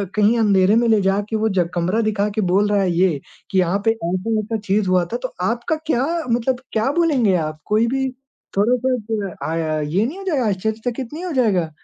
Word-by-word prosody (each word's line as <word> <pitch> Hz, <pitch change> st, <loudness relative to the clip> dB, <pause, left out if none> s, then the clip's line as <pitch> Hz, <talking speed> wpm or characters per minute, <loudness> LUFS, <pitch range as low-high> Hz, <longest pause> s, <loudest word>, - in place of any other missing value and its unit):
कहीं 215 Hz, +2 st, +3 dB
अंधेरे 200 Hz, -2 st, +4 dB
में 235 Hz, +1 st, +3 dB
ले 220 Hz, -2 st, +4 dB
जा 195 Hz, +1 st, +2 dB
के 220 Hz, -, -2 dB
वो 220 Hz, 0 st, +1 dB
ज 185 Hz, -4 st, +1 dB
कमरा 180 Hz, +6 st, +1 dB
दिखा 210 Hz, -2 st, 0 dB
के 220 Hz, -, +1 dB
बोल 200 Hz, +3 st, +3 dB
रहा 205 Hz, -1 st, +2 dB
है 185 Hz, -2 st, +1 dB
ये 170 Hz, -3 st, +2 dB, 0.3 s
कि 190 Hz, -, +2 dB
यहाँ 185 Hz, +2 st, +1 dB
पे 225 Hz, -, +5 dB
ऐसा-ऐसा 215 Hz, +3 st, -2 dB
चीज़ 205 Hz, -1 st, 0 dB
हुआ 180 Hz, -1 st, +3 dB
था -, -, +1 dB
तो 255 Hz, -, -4 dB
आपका 235 Hz, +9 st, 0 dB
क्या 265 Hz, -4 st, +1 dB, 0.2 s
मतलब 245 Hz, +2 st, 0 dB
क्या 225 Hz, +4 st, +1 dB
बोलेंगे 285 Hz, -, +2 dB
आप? 155 Hz, -2 st, -2 dB
कोई 215 Hz, +2 st, +2 dB
भी 265 Hz, +2 st, 0 dB, 0.5 s
थोड़ा-सा 250 Hz, +5 st, +2 dB, 0.3 s
अ, -, -, -12 dB
हाँ 155 Hz, -1 st, -1 dB
ये 175 Hz, +9 st, 0 dB
नहीं 290 Hz, +10 st, -4 dB
हो 390 Hz, -, -8 dB
जायेगा? 285 Hz, -, +1 dB
आश्चर्यचकित 220 Hz, +5 st, -3 dB
नहीं 335 Hz, +4 st, -5 dB
हो 360 Hz, -, -3 dB
जायेगा? 205 Hz, -, +2 dB
215 Hz, 215 wpm, -20 LUFS, 185-240 Hz, 0.5 s, पे